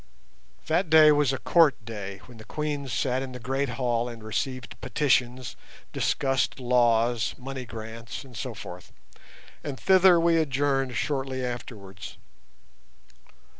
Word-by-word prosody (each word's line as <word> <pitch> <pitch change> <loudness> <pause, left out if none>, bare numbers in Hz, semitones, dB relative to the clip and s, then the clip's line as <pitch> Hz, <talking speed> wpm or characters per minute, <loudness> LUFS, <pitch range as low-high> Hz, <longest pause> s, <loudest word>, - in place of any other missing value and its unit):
That 165 +2 +1
day 155 -1 +8
was 145 -3 +3
a 135 - -2
Court 160 +1 +4
day, 100 -3 -7
when 120 -3 -14
the - - -10
Queens 145 +2 -4
sat 125 +4 0
in 130 -1 -6
the 125 - -7
great 135 +3 -1
hall 120 -2 0
and 115 -2 -10
received 125 +4 -3
petitions, 130 -2 0 0.4
discussed 135 0 0
laws, 120 -2 +2
money 130 0 -6
grants, 115 +1 -8
and 130 -3 -14
so 125 0 -5
forth, 90 -4 -10 0.7
and 135 -2 -5
thither 185 -2 +6
we 165 0 +3
adjourned 135 -3 0
shortly 130 +2 -2
afterwards. 105 -6 -7
130 Hz, 130 wpm, -26 LUFS, 115-140 Hz, 0.7 s, day